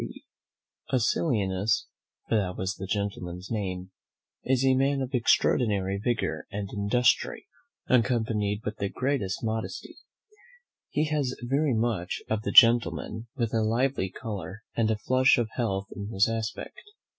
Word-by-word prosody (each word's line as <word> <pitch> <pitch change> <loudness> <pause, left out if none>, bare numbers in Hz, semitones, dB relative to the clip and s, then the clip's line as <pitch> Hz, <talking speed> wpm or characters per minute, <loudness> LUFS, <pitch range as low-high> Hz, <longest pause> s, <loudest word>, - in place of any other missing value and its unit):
"Acilianus," 105 - +1 0.4
for - - -2
that 95 -4 0
was 95 +1 -2
the 95 -1 -7
gentleman's 95 -2 -4
name, 95 -4 -3 0.5
"is 130 0 +2
a 130 - +5
man 135 +1 +2
of 130 0 -4
extraordinary 100 -5 +2
vigour 120 +2 -2
and 100 -1 -5
industry, 105 +5 +1 0.4
accompanied 110 -4 +1
with 105 +1 -3
the 100 - -2
greatest 125 -8 -2
modesty: 110 0 -4 0.9
he 150 - +1
has 145 -4 -1
very 135 +1 +1
much 110 -6 -1
of 110 -1 +1
the - - -2
gentleman, 115 -2 +5
with 120 -4 -2
a 115 - +2
lively 115 -1 +1
colour, 105 -1 -7
and 110 -1 +2
flush 130 +1 +4
of 115 -2 -1
health 100 -5 -1
in 100 -1 -5
his 95 -1 +3
aspect. 115 -1 -4
110 Hz, 135 wpm, -27 LUFS, 100-125 Hz, 0.9 s, a